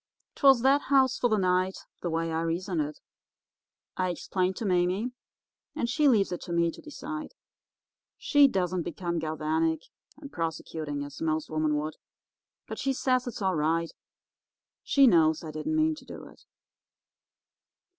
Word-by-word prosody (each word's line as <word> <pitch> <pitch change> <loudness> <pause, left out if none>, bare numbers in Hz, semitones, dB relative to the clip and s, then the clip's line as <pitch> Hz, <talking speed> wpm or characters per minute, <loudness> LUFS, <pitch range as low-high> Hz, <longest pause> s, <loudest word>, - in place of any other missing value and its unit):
'Twas 270 -4 +5
that 275 +2 +5
house 265 -2 +4
for 245 - +2
the 215 - +2
night, 185 0 +1 0.2
the 175 - -2
way 165 0 -1
I 160 0 -1
reasoned 170 +1 -1
it. 150 0 -5 1.0
I 185 -1 0
explained 185 +2 -1
to 230 - -4
Mame, 185 +6 +1 0.6
and 235 - -1
she 295 +5 +2
leaves 215 -8 +3
it 180 - -4
to 175 - -7
me 170 0 +2
to - - -13
decide. 310 - -7 0.8
She 290 -1 +5
doesn't 185 -6 -1
become 170 0 -3
galvanic 160 +1 -1 0.3
and 285 -2 -11
prosecuting, 155 -3 -4
as 145 -1 -9
most 160 -1 -1
women 155 -1 +1
would, 155 +1 -4 0.7
but - - -7
she 270 - 0
says 255 -1 +1
it's 230 -4 -5
all 190 -1 +2
right; 165 +2 0 0.9
she 275 -1 +4
knows 160 -8 +4
I 155 - -6
didn't 155 - -3
mean 315 0 +3
to 310 - -12
do - - -9
it. - - -20
180 Hz, 155 wpm, -28 LUFS, 160-250 Hz, 1.0 s, Twas